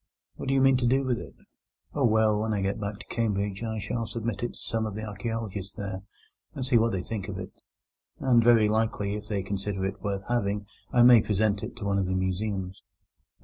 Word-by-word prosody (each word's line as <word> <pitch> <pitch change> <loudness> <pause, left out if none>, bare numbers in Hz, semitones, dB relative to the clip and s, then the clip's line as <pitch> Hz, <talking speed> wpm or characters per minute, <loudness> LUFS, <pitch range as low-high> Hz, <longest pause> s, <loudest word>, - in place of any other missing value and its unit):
What - - -7
do 135 - +2
you 135 - +4
mean 135 -1 +5
to 125 -1 +1
do 135 +2 +3
with 125 -3 0
it?" - - -10 0.6
"Oh, 140 -3 +2
well, 110 -2 +3
when 110 0 0
I 100 -2 0
get 100 +2 -1
back 100 0 -3
to - - -11
Cambridge 100 -3 -1
I 110 -1 -3
shall 110 +3 -2
submit 115 -3 -3
it 120 - -2
to - - -13
some 110 -1 -1
of 105 - -6
the 110 - -4
archaeologists 105 -2 -4
there, 95 -2 -5 0.5
and 130 - -3
see 125 -3 +4
what 115 +1 +2
they 95 -3 -2
think 105 -2 -4
of 100 -2 -5
it; 90 0 -6 0.7
and 120 -3 +4
very 115 -2 +6
likely, 105 -2 0
if 105 0 -5
they 100 -3 -1
consider 100 0 -2
it 95 +1 -4
worth 100 -1 -2
having, 105 -4 0 0.3
I 120 - +5
may 120 -2 +9
present 105 0 +1
it 115 +2 -6
to 115 -4 -6
one 100 0 +1
of 95 - 0
the 95 - 0
museums." 95 0 -2
105 Hz, 230 wpm, -27 LUFS, 100-115 Hz, 0.7 s, may